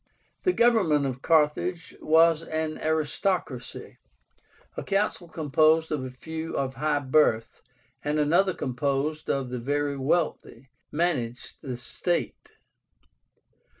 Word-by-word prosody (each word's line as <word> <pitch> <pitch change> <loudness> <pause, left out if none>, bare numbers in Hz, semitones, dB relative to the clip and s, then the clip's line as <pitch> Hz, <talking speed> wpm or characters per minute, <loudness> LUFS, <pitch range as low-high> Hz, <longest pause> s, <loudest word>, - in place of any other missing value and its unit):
The 365 - +5
government 215 - +3
of 130 -1 -4
Carthage 165 +3 +1
was 165 0 +4
an 155 -1 -3
ARISTOCRACY. 155 -2 -2 0.8
A - - -4
council 195 -3 -1
composed 160 0 +2
of 150 -4 -1
a 130 - -5
few 160 +5 -6
of 135 -1 -1
high 150 +2 0
birth, 130 -5 +2 0.4
and 150 +1 0
another 170 +5 +3
composed 140 +4 -2
of 135 -2 -1
the 125 - -3
very 145 +3 -1
wealthy, 135 -3 -1 0.2
managed 145 -8 -2
the 130 -5 -5
state. 170 +8 -3
155 Hz, 115 wpm, -26 LUFS, 135-165 Hz, 0.8 s, The